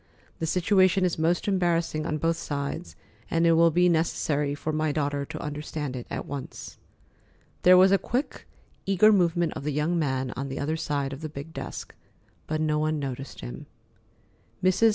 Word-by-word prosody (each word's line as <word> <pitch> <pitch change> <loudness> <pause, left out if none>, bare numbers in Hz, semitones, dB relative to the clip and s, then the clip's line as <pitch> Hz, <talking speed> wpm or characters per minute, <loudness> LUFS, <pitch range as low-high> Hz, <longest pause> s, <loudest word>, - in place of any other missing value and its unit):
The 160 - -1
situation 185 +2 +3
is 175 -3 -1
most 170 +4 +1
embarrassing 170 -5 +1
on 155 - -1
both 165 +2 +1
sides, 145 +4 -4 0.3
and 165 0 +2
it 165 - +5
will 165 +1 +5
be 175 +2 +3
necessary 150 -3 +1
for 155 +1 -3
my 155 0 +1
daughter 145 -1 -1
to - - -7
understand 150 -2 -4
it 120 - -6
at - - -4
once." 140 -2 -7 0.8
There 180 0 +7
was 190 +1 +6
a 195 - +4
quick, 255 +5 -3 0.4
eager 195 +2 +5
movement 175 -3 +2
of - - -6
the 150 - -1
young 155 +4 0
man 130 -4 -1
on 135 +1 -5
the 135 - -5
other 155 +3 -1
side 145 -3 -2
of 135 - -8
the 155 - -4
big 145 +2 -8
desk, - - -7 0.5
but 155 0 -1
no 155 -1 +1
one 155 0 0
noticed 135 -1 -5
him. - - -8 1.0
Mrs. 185 +5 +5
155 Hz, 180 wpm, -26 LUFS, 145-175 Hz, 1.0 s, There